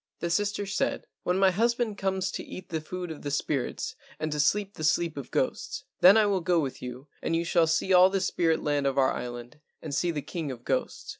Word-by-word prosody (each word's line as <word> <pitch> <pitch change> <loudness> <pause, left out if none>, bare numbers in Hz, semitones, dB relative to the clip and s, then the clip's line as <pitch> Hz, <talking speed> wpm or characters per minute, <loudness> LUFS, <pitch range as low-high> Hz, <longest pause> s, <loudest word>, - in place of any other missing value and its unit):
The 170 - -2
sister 205 +2 0
said, 195 - -1 0.2
"When 180 +1 0
my 190 -1 +5
husband 235 +2 +1
comes 190 0 -1
to - - -5
eat 185 - -9
the 160 -2 -2
food 180 +2 -6
of 155 - -8
the 145 - -4
spirits 140 - -2 0.2
and 155 0 -2
to 150 - -2
sleep 200 +6 +2
the 155 - -7
sleep 160 +1 +2
of 140 -2 -7
ghosts, - - -2 0.2
then 190 +4 +8
I 215 - +5
will 195 -3 +1
go 175 0 +2
with 140 -4 -3
you 125 +3 -7
and 165 - 0
you 170 +1 0
shall 170 -1 +3
see 165 +4 +1
all 180 +1 +8
the 195 0 0
spirit 170 -3 +1
land 145 -2 +1
of 135 - -1
our 135 -1 +4
island 120 +3 -6 0.2
and 155 -3 -6
see 175 - +1
the 150 -4 -2
king 160 0 -4
of 120 -2 -9
ghosts." - - -2
170 Hz, 235 wpm, -28 LUFS, 150-190 Hz, 0.2 s, then